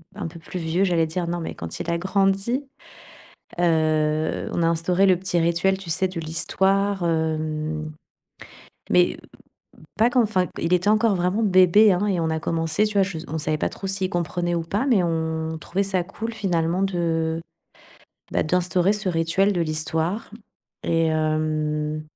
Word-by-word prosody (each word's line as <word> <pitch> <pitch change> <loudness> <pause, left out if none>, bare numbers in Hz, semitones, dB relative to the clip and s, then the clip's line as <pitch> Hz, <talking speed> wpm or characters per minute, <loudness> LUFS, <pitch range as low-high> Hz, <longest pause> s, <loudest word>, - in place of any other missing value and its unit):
un 205 - -4
peu 170 +1 -10
plus 180 +2 -7
vieux, 170 +4 +1
j'allais 170 -3 +2
dire, 170 +2 -3
non, 175 0 -2
mais 165 - -5
quand 80 0 -7
il 170 - -3
a 170 - +1
grandi, 195 +7 +1 1.0
heu, 155 -2 +1
on 170 - 0
a - - +3
instauré 170 +3 +2
le 185 - +5
petit 180 -1 -1
rituel, 170 +3 +2
tu 190 -3 -9
sais, 190 +3 +1
du 180 -2 -5
l'histoire. 195 +4 0
Hem, 155 -1 -2 1.0
mais, 90 0 +4
heu, - - -12 0.8
pas 230 +2 +5
que 250 - -2
enfin 200 -6 +2
q - - -20
il 170 +2 0
était 180 +3 +2
encore 215 0 +3
vraiment 180 +5 0
bébé 195 +2 +6
hein, 185 +3 0
et 190 -4 0
on 160 -1 0
a 160 - -1
commencé 165 +5 0
tu 210 -1 -4
vois, 195 - +5
je 185 -4 -4
on 160 - -3
savait 155 0 -1
pas - - -1
trop 195 - -7
s'il 190 -1 0
comprenait 175 0 -1
ou 170 - -1
pas, 200 +10 -1
mais 215 -8 +3
on 160 -1 -2
trouvait 190 +6 -1
ça 190 -2 0
cool 225 +5 -6
finalement 180 -4 0
de 165 -3 0 0.9
bah - - +2
d'instaurer 180 +3 +1
ce 210 -2 -3
rituel 170 +4 +1
de 180 - -1
l'histoire, 160 +5 -2 0.5
et 165 -1 +2
hem 155 -1 -1
170 Hz, 180 wpm, -23 LUFS, 160-195 Hz, 1.0 s, bébé